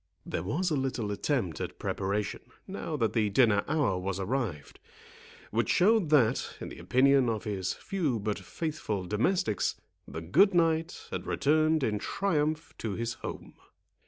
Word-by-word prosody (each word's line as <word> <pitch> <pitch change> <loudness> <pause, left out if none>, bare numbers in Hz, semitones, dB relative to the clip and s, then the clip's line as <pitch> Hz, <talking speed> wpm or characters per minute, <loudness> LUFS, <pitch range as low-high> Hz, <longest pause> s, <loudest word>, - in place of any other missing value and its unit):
There - - -3
was 160 - -1
a - - +2
little 130 -6 -1
attempt 100 - -1
at - - -5
preparation, 100 +1 -2 0.3
now - - -4
that 110 -2 0
the 110 -2 +2
dinner 105 -2 +4
hour 130 -13 +1
was 95 +1 -3
arrived, 95 - -3 0.7
which 115 +2 0
showed 200 -2 +4
that, 130 -5 +3
in - - -6
the - - -10
opinion 135 -1 +4
of 110 -2 -2
his 95 -4 -2
few 170 - -1
but 105 0 -2
faithful 110 - -3
domestics, 105 - +1 0.3
the 80 - -6
good 180 - +4
knight 165 0 +1
had - - -4
returned 155 +1 +2
in 105 -4 0
triumph 155 - -1
to 110 -3 -3
his 115 +2 -2
home. - - -7
120 Hz, 155 wpm, -29 LUFS, 100-155 Hz, 0.7 s, dinner